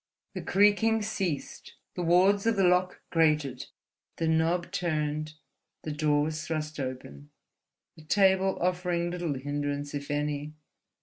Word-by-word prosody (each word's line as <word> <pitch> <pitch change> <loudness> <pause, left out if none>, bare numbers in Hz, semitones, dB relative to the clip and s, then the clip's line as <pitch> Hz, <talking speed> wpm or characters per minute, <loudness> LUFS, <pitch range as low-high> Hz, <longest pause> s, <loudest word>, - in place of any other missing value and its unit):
The - - -5
creaking 210 +2 +3
ceased, 190 -8 -4 0.2
the - - -4
wards 190 +5 +3
of 230 - +3
the 195 - +2
lock 180 0 +2
grated, 150 -6 +1 0.5
the 165 - -1
knob 165 +2 +1
turned, 155 -4 -2 0.5
the 155 - -4
door 150 -1 +1
was 155 0 -3
thrust 155 -2 -4
open—the 130 - -10
table 190 +2 +3
offering 175 -1 0
little 175 -5 -2
hindrance 145 +1 -3
if 140 -1 -5
any. 145 +1 -2
160 Hz, 125 wpm, -28 LUFS, 145-180 Hz, 0.5 s, creaking